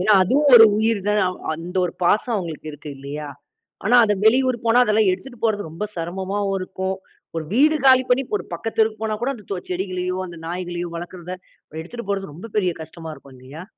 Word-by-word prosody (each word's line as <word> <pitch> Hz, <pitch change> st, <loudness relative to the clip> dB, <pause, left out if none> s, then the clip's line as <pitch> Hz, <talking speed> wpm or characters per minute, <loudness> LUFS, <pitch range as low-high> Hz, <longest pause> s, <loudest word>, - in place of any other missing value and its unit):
ஏன்னா 205 Hz, +4 st, +4 dB
அதுவும் 280 Hz, +10 st, +3 dB
ஒரு 225 Hz, -, +11 dB
உயிர் 220 Hz, -1 st, +1 dB
தான். 210 Hz, 0 st, +3 dB, 0.3 s
அந்த 170 Hz, +4 st, -7 dB
ஒரு 175 Hz, -, -2 dB
பாசம் 215 Hz, +6 st, +2 dB
அவுங்களுக்கு 165 Hz, -5 st, -5 dB
இருக்கு 150 Hz, +1 st, -10 dB
இல்லயா! 145 Hz, +2 st, -6 dB, 0.6 s
ஆனா, 245 Hz, +5 st, +5 dB
அத 210 Hz, -, +2 dB
வெளியூர் 255 Hz, +3 st, +4 dB
போனா 230 Hz, +2 st, +5 dB
அதெல்லாம் 215 Hz, -2 st, +3 dB
எடுத்துட்டு 240 Hz, +7 st, -5 dB
போறது 205 Hz, -5 st, 0 dB
ரொம்ப 165 Hz, +6 st, -4 dB
சிரமமா 190 Hz, +4 st, -3 dB, 0.2 s
இருக்கும். 190 Hz, +1 st, -3 dB, 0.4 s
ஒரு 160 Hz, -, -2 dB
வீடு 305 Hz, +5 st, +5 dB
காலி 260 Hz, -1 st, +7 dB
பண்ணி 250 Hz, +2 st, +4 dB, 0.2 s
ஒரு -, -, -8 dB
பக்கத்து 225 Hz, -, -5 dB
தெருவுக்குப் 220 Hz, 0 st, +2 dB
போனா 215 Hz, -1 st, -1 dB
கூட 270 Hz, +3 st, +1 dB
அந்த 215 Hz, -5 st, -13 dB
தோ 195 Hz, -, -1 dB
செடிகளையும் 185 Hz, 0 st, -2 dB
அந்த 175 Hz, -1 st, -10 dB
நாய்களையும் 175 Hz, 0 st, -4 dB
வளர்க்கிறத 175 Hz, +1 st, -7 dB, 0.5 s
எடுத்துட்டு 200 Hz, +6 st, -8 dB
போறது 195 Hz, -5 st, -3 dB
ரொம்ப 180 Hz, +9 st, -9 dB
பெரிய 185 Hz, -4 st, +2 dB
கஷ்டமா 160 Hz, 0 st, -9 dB
இருக்கும் 140 Hz, -3 st, -16 dB
இல்லயா! 135 Hz, +6 st, -10 dB
190 Hz, 185 wpm, -22 LUFS, 175-225 Hz, 0.6 s, ஒரு